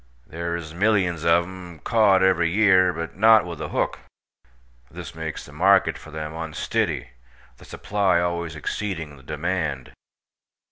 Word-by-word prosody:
Thare 85 +1 -3
iz 80 -2 -7
millyuns 95 -4 +1
ov 85 +1 +5
them 90 -1 -10
kaught 100 +1 +3
every 85 -3 +3
year, 95 -2 +4
but 85 -1 -6
not 110 0 +6
with 85 -3 -7
a - - -3
hook, - - -1 0.9
this - - -9
makes 80 0 -6
the 70 - -14
market 95 +6 +3
for - - -12
them 80 0 -6
unstiddy, 80 -5 -2 0.5
the - - -15
supply 100 -3 0
allways 85 -2 -2
exceeding 80 -1 -4
the 65 - -16
demand. 75 -3 -3
85 Hz, 145 wpm, -23 LUFS, 80-95 Hz, 0.9 s, not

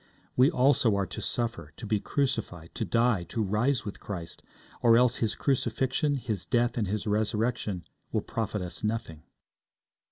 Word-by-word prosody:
We 130 +3 +6
also 130 - +4
are 100 -1 +1
to - - -7
suffer, 120 0 -2
to 120 - -7
be 105 0 +1
crucified, 100 - -2
to - - -2
die, 115 -4 +2
to 110 +6 -2
rise 110 +6 +1
with 100 - -6
Christ, 85 -5 -6 0.4
or 115 -1 +6
else 125 0 +4
His 110 -2 0
crucifixion, 135 +2 +1
His 110 -8 -3
death, 120 0 +1
and 110 -4 0
His 105 +2 -2
resurrection 105 -2 0 0.3
will - - +1
profit 105 -3 -3
us 90 +2 -6
nothing. 105 -8 -2
115 Hz, 160 wpm, -28 LUFS, 100-125 Hz, 0.4 s, We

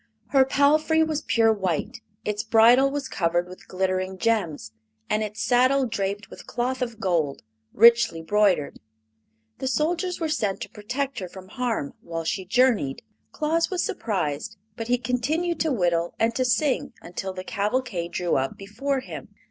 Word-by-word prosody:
Her 270 -2 +5
palfrey 305 +4 +3
was 315 -1 -1
pure 225 -5 +3
white, 205 - -2 0.2
its 210 0 -1
bridle 230 +4 +5
was 280 -1 -3
covered 175 -4 0
with 185 0 -13
glittering 185 0 -1
gems, 180 - -1 0.4
and 215 - +2
its 215 0 -3
saddle 255 +2 +3
draped 205 -3 -3
with - - -12
cloth 250 +2 -2
of 235 -3 -3
gold, 170 -9 0 0.3
richly 230 -7 +5
broidered. 195 -4 +2 0.8
The 265 - -2
soldiers 345 +6 0
were 325 - -1
sent 210 -10 -1
to - - -6
protect 250 +5 -3
her 185 - -5
from 190 0 -12
harm 230 - -2
while 165 -1 -5
she 185 +4 -2
journeyed. 215 - +2 0.3
Claus 320 +2 0
was 370 -3 -1
surprised, 195 -1 -2 0.2
but 225 0 -5
he 245 +1 +3
continued 275 +9 -1
to 320 - +1
whittle 175 -7 0
and 225 +1 +2
to 255 +2 0
sing 260 +1 +1
until 180 +2 -5
the 185 0 -7
cavalcade 205 -3 -2
drew 175 -1 0
up 135 0 -2
before 260 +8 -2
him. - - -8
225 Hz, 160 wpm, -25 LUFS, 185-260 Hz, 0.8 s, Her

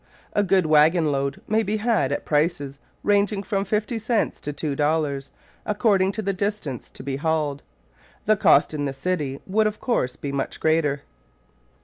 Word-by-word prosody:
A 205 - +3
good 190 -2 +3
waggon 155 +1 +4
load 140 0 -2
may 220 +1 +2
be 215 0 -1
had 215 - +1
at 145 - -2
prices 145 -3 0 0.2
ranging 205 0 +2
from 195 0 -1
fifty 215 +3 -1
cents 225 +1 -1
to 145 - -3
two 145 0 -3
dollars, 145 -2 0 0.3
according 200 -3 +2
to 220 - -4
the 195 0 0
distance 195 - -3
to - - -11
be 135 0 -3
hauled. 150 -2 -1 0.6
The 215 - +4
cost 150 -6 +4
in 145 -1 -2
the 135 - -2
city 140 -2 -2
would, 215 +3 +2
of 215 0 -4
course, 130 - 0
be 140 - -5
much 140 -1 -3
greater. 155 -3 +1
160 Hz, 170 wpm, -24 LUFS, 140-205 Hz, 0.6 s, waggon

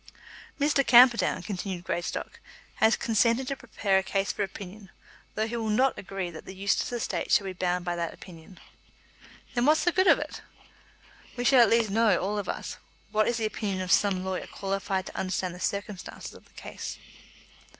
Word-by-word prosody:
"Mr. 285 -1 +3
Camperdown," 245 -2 +6
continued 190 -3 -4
Greystock, 175 0 -4 0.4
"has 220 +1 +4
consented 230 +3 +1
to 275 - -2
prepare 210 -6 0
a - - -3
case 195 +1 -1
for - - -5
opinion, 195 0 -6 0.5
though 215 - 0
he 230 +2 -4
will 225 -2 -2
not 255 +5 +3
agree 190 -2 -5
that 160 - -10
the 190 - -9
Eustace 195 +4 0
estate 240 -2 -3
shall 200 - +4
be 190 - -4
bound 180 0 -1
by 175 -1 -1
that 170 -1 -2
opinion." 170 0 -14 0.9
"Then 245 +1 +1
what's 310 +1 +4
the 350 - +3
good 375 +2 +2
of - - +7
it?" - - -6 1.0
"We 245 - -2
shall 260 +1 +5
at 235 - +6
least 230 -3 +3
know, 225 +1 +3
all 205 +2 -2
of 200 - -5
us, - - -5 0.3
what 215 0 +2
is 235 - 0
the 225 - -1
opinion 205 -3 -2
of 180 - -3
some 190 -3 +3
lawyer 190 -1 -3
qualified 195 -1 -3
to - - -9
understand 185 -1 -2
the 180 - -10
circumstances 200 0 -5
of - - -16
the - - -26
case." - - -7
200 Hz, 190 wpm, -27 LUFS, 185-230 Hz, 1.0 s, of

